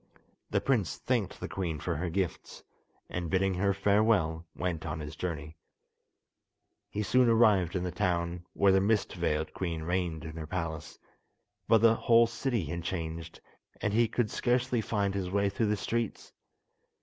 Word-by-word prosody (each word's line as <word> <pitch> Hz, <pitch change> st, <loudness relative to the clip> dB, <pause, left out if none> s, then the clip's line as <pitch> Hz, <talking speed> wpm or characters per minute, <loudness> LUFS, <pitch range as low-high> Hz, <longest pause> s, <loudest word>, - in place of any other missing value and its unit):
The -, -, +2 dB
prince 115 Hz, -10 st, 0 dB
thanked 120 Hz, -7 st, -1 dB
the -, -, -4 dB
queen 85 Hz, -5 st, -3 dB
for 85 Hz, +2 st, -2 dB
her 85 Hz, +2 st, -2 dB
gifts, 95 Hz, +1 st, -3 dB, 0.4 s
and, 90 Hz, -2 st, -4 dB
bidding 95 Hz, +2 st, +2 dB
her 100 Hz, +2 st, +1 dB
farewell, 100 Hz, -5 st, +2 dB
went 85 Hz, -3 st, -2 dB
on 80 Hz, -1 st, -4 dB
his 75 Hz, +1 st, -7 dB
journey. 80 Hz, -3 st, -5 dB, 1.3 s
He 105 Hz, -, -2 dB
soon 125 Hz, +3 st, +4 dB
arrived 105 Hz, -6 st, +4 dB
in 90 Hz, -, 0 dB
the 90 Hz, -, -2 dB
town 85 Hz, 0 st, -1 dB
where 100 Hz, -1 st, +4 dB
the 95 Hz, 0 st, +4 dB
mist 105 Hz, +1 st, +1 dB
veiled 75 Hz, +1 st, -1 dB
queen 85 Hz, -4 st, -3 dB
reigned 85 Hz, -2 st, -1 dB
in 80 Hz, 0 st, -7 dB
her 80 Hz, -1 st, -5 dB
palace, 80 Hz, -2 st, -4 dB, 0.7 s
but 110 Hz, -2 st, +5 dB
the 115 Hz, 0 st, +6 dB
whole 115 Hz, +1 st, +5 dB
city 115 Hz, -3 st, -2 dB
had 85 Hz, +3 st, -4 dB
changed, 80 Hz, -2 st, -5 dB, 0.4 s
and 105 Hz, -, -1 dB
he 115 Hz, +1 st, +4 dB
could 115 Hz, -1 st, -1 dB
scarcely 125 Hz, -1 st, +1 dB
find 100 Hz, -3 st, -1 dB
his 95 Hz, -2 st, -2 dB
way 100 Hz, +1 st, +1 dB
through 100 Hz, +3 st, 0 dB
the 105 Hz, -, +1 dB
streets. 115 Hz, 0 st, -3 dB
95 Hz, 165 wpm, -30 LUFS, 85-105 Hz, 1.3 s, the